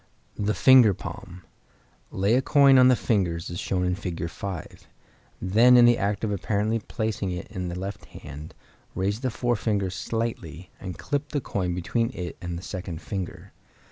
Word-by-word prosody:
The 105 Hz, +1 st, 0 dB
Finger 125 Hz, -7 st, +6 dB
Palm.—Lay 90 Hz, -, -6 dB
a 130 Hz, -, +4 dB
coin 140 Hz, -1 st, +6 dB
on 125 Hz, -, +7 dB
the 130 Hz, -, +6 dB
fingers 85 Hz, -9 st, -1 dB
as 85 Hz, -, -5 dB
shown 90 Hz, -1 st, -1 dB
in 90 Hz, -, +1 dB
Fig. 90 Hz, -3 st, -4 dB
5. 95 Hz, -5 st, -7 dB, 0.5 s
Then 115 Hz, +7 st, +5 dB
in 120 Hz, -, +8 dB
the 120 Hz, 0 st, +4 dB
act 100 Hz, +1 st, -1 dB
of 110 Hz, -, 0 dB
apparently 105 Hz, +3 st, 0 dB
placing 110 Hz, -2 st, -3 dB
it 90 Hz, -1 st, -4 dB
in 90 Hz, -4 st, -4 dB
the 85 Hz, 0 st, -5 dB
left 95 Hz, +2 st, -6 dB
hand, 75 Hz, +2 st, -10 dB, 0.4 s
raise 100 Hz, +3 st, -1 dB
the 130 Hz, 0 st, -1 dB
forefinger 110 Hz, -5 st, -1 dB
slightly, 95 Hz, -5 st, -4 dB
and 90 Hz, -3 st, -7 dB
clip 145 Hz, 0 st, -3 dB
the 145 Hz, -, -1 dB
coin 90 Hz, -8 st, -2 dB
between 115 Hz, +6 st, -1 dB
it 90 Hz, -1 st, -5 dB
and 90 Hz, -2 st, -4 dB
the 85 Hz, -, -8 dB
second 90 Hz, -4 st, -6 dB
finger. 90 Hz, +3 st, -6 dB
100 Hz, 170 wpm, -25 LUFS, 90-115 Hz, 0.5 s, in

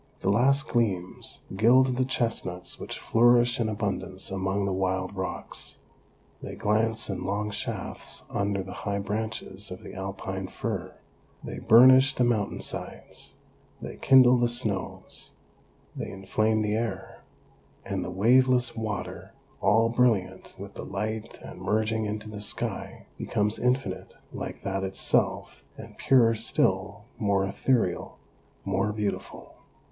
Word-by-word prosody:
The 95 Hz, -, +2 dB
last 135 Hz, +7 st, +3 dB
gleams 100 Hz, -7 st, -2 dB
gild 125 Hz, +5 st, +5 dB
the 130 Hz, +1 st, +1 dB
chestnuts 115 Hz, -8 st, -2 dB
which -, -, -5 dB
flourish 120 Hz, +1 st, +4 dB
in 110 Hz, -2 st, +1 dB
abundance 100 Hz, -3 st, -2 dB
among 95 Hz, +1 st, -1 dB
the 100 Hz, -, -1 dB
wild 95 Hz, 0 st, -1 dB
rocks; 95 Hz, -1 st, -4 dB, 0.6 s
they -, -, -7 dB
glance 110 Hz, +1 st, +1 dB
in 100 Hz, -, -4 dB
long 105 Hz, +2 st, -2 dB
shafts -, -, -3 dB
under 100 Hz, -1 st, -1 dB
the 95 Hz, -, -8 dB
high 100 Hz, -1 st, -3 dB
branches 105 Hz, -1 st, -3 dB
of 90 Hz, -, -9 dB
the -, -, -9 dB
Alpine 95 Hz, 0 st, -5 dB
fir; -, -, -4 dB, 0.5 s
they -, -, -6 dB
burnish 130 Hz, +4 st, +7 dB
the 125 Hz, -, +2 dB
mountain 110 Hz, -4 st, 0 dB
sides; -, -, -6 dB, 0.4 s
they -, -, -7 dB
kindle 125 Hz, -2 st, +6 dB
the 120 Hz, 0 st, +2 dB
snows; 110 Hz, -6 st, -2 dB, 0.6 s
they -, -, -5 dB
inflame 110 Hz, +3 st, 0 dB
the 105 Hz, 0 st, 0 dB
air, 115 Hz, +1 st, -3 dB, 0.6 s
and -, -, -2 dB
the -, -, -5 dB
waveless 125 Hz, +6 st, +3 dB
water, 110 Hz, -3 st, -5 dB, 0.3 s
all 110 Hz, +3 st, +4 dB
brilliant 115 Hz, -6 st, +1 dB
with -, -, -9 dB
the -, -, -7 dB
light 110 Hz, +2 st, -4 dB
and -, -, -10 dB
merging 110 Hz, +1 st, 0 dB
into 105 Hz, +1 st, -4 dB
the 105 Hz, -1 st, -7 dB
sky, 105 Hz, -, -3 dB
becomes 105 Hz, +1 st, 0 dB
infinite 125 Hz, -6 st, -1 dB, 0.2 s
like -, -, -6 dB
that 95 Hz, 0 st, -2 dB
itself, 95 Hz, 0 st, 0 dB
and -, -, -11 dB
purer 120 Hz, -4 st, +5 dB
still, 100 Hz, -2 st, 0 dB, 0.2 s
more 100 Hz, -3 st, +2 dB
ethereal, 100 Hz, -1 st, 0 dB, 0.5 s
more 100 Hz, +2 st, 0 dB
beautiful. 105 Hz, -1 st, -5 dB
105 Hz, 130 wpm, -27 LUFS, 95-120 Hz, 0.6 s, burnish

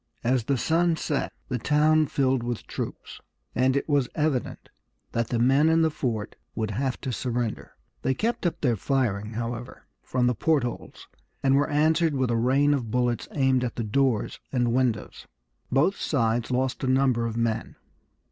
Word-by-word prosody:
As 120 Hz, -1 st, +1 dB
the 140 Hz, 0 st, +1 dB
sun 165 Hz, +5 st, +2 dB
set 150 Hz, -2 st, -2 dB, 0.2 s
the 125 Hz, -2 st, -2 dB
town 150 Hz, +4 st, +3 dB
filled 135 Hz, -2 st, +1 dB
with 120 Hz, -1 st, -4 dB
troops, -, -, -6 dB, 0.3 s
and 130 Hz, +3 st, +2 dB
it 140 Hz, -, -1 dB
was 145 Hz, -4 st, +2 dB
evident 150 Hz, -5 st, -1 dB, 0.4 s
that 115 Hz, -1 st, -1 dB
the 120 Hz, -, -1 dB
men 135 Hz, +6 st, +4 dB
in 165 Hz, 0 st, +4 dB
the 160 Hz, -, +2 dB
fort 115 Hz, -8 st, -3 dB, 0.2 s
would 110 Hz, -2 st, -2 dB
have 130 Hz, +4 st, -2 dB
to 130 Hz, -, -3 dB
surrender. 120 Hz, -2 st, -3 dB, 0.3 s
They 130 Hz, +1 st, 0 dB
kept 225 Hz, -, 0 dB
up 170 Hz, -, -4 dB
their 125 Hz, -5 st, +2 dB
firing, 110 Hz, -3 st, -1 dB
however, 120 Hz, +2 st, -5 dB, 0.2 s
from 125 Hz, -1 st, 0 dB
the 125 Hz, -, +3 dB
port 150 Hz, +3 st, +2 dB
holes, 120 Hz, -, -6 dB, 0.4 s
and 135 Hz, -1 st, +4 dB
were 145 Hz, +2 st, +2 dB
answered 155 Hz, +1 st, +2 dB
with 130 Hz, -2 st, +1 dB
a -, -, +1 dB
rain 135 Hz, +5 st, +3 dB
of 125 Hz, -6 st, -2 dB
bullets 125 Hz, 0 st, 0 dB
aimed 130 Hz, -3 st, +2 dB
at 120 Hz, -, -3 dB
the 120 Hz, -, -2 dB
doors 115 Hz, +1 st, 0 dB
and 120 Hz, -3 st, +1 dB
windows. 125 Hz, -4 st, -1 dB, 0.4 s
Both 150 Hz, +10 st, +3 dB
sides 115 Hz, -4 st, 0 dB
lost 130 Hz, +1 st, -1 dB
a -, -, 0 dB
number 130 Hz, -3 st, +2 dB
of 115 Hz, 0 st, -4 dB
men. 115 Hz, -2 st, -1 dB
130 Hz, 175 wpm, -26 LUFS, 120-145 Hz, 0.4 s, men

